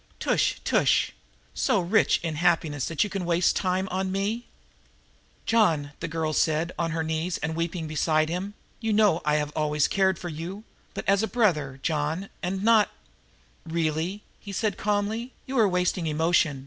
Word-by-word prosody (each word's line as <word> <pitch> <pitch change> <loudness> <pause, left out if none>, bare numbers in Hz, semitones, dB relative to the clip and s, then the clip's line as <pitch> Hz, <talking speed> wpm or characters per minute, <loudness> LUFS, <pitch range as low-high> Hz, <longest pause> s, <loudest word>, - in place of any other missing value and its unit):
Tush, - - +1
tush! - - +2 0.4
So 205 - +2
rich 185 +5 +3
in 160 -3 -2
happiness 160 -4 +1
that 165 +2 +1
you 210 - -3
can 195 -2 -3
waste 170 0 +2
time 185 0 0
on 190 +1 -1
me?" 205 +5 -2 1.0
"John," 210 -10 +3
said 145 0 -12
the 170 - -3
girl 160 -1 -2 0.4
on 170 -1 0
her 160 0 -1
knees 160 +2 -2
and 160 +2 -3
weeping 165 0 -2
beside 155 0 +1
him, 185 +5 -4 0.2
"you 225 -2 -1
know 205 -5 +4
that 150 - 0
I 150 - +3
have 150 -1 -1
always 150 -1 +1
cared 190 -2 +2
for 175 - -6
you, 170 +6 -6 0.3
but - - -5
as 200 +1 +4
a 220 - 0
brother, 160 - +1
John, 160 +4 -1
and 190 +2 -2
not 220 -2 +5 0.4
" - - -33 0.3
"Really," 165 +4 -2 0.2
he 200 - -9
said 200 0 -1
calmly, 210 +4 -1
"you 265 - -5
are 215 -3 +5
wasting 180 -1 0
emotion. 155 -2 +2
175 Hz, 175 wpm, -26 LUFS, 160-200 Hz, 1.0 s, not